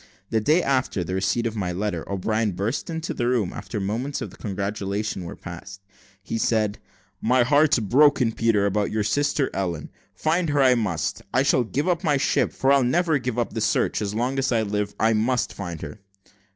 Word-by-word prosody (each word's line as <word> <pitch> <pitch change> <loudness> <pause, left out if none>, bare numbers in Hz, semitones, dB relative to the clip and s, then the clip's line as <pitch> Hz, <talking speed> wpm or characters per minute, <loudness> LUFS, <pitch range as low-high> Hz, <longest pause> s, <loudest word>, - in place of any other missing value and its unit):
The 110 -1 +2
day 155 +10 +3
after 130 -8 0
the 90 +2 -5
receipt 95 +5 0
of 115 -1 -2
my 95 -4 -2
letter, 95 -1 -3
O'Brien 110 +2 0
burst 105 - -2
into 165 0 -3
the 120 - -1
room. 120 -7 0
After 105 +2 -6
the 100 - -2
first - - -2
moments 125 +8 -3
of 100 -5 -6
congratulation 100 -1 -3
were - - -7
past, 90 +4 -9 0.4
he 115 +3 -3
said, 110 -2 +1 0.4
"My 125 +2 +3
heart's 150 +4 +4
broke, 135 +7 +4 0.2
Peter, 115 -3 +2
about 100 +1 0
your 110 -1 -1
sister 145 +5 +1
Ellen: 85 -6 -3 0.2
find 165 +1 0
her 145 -1 +2
I 130 -1 +6
must. 95 -10 -1
I 130 - +3
shall 130 -2 +3
give 140 +8 -2
up 175 0 +1
my 150 -4 +2
ship, - - +1
for 135 - +1
I'll 140 -1 +5
never 160 +4 +2
give 125 -1 -3
up 120 - -1
the 110 - -3
search 110 - +1
as 105 0 -3
long 125 +4 0
as 135 - 0
I 115 -2 +2
live. 105 -1 -2
I 110 +1 +3
must 115 +3 0
find 85 -5 -6
her." 110 - -8
110 Hz, 205 wpm, -24 LUFS, 100-135 Hz, 0.4 s, I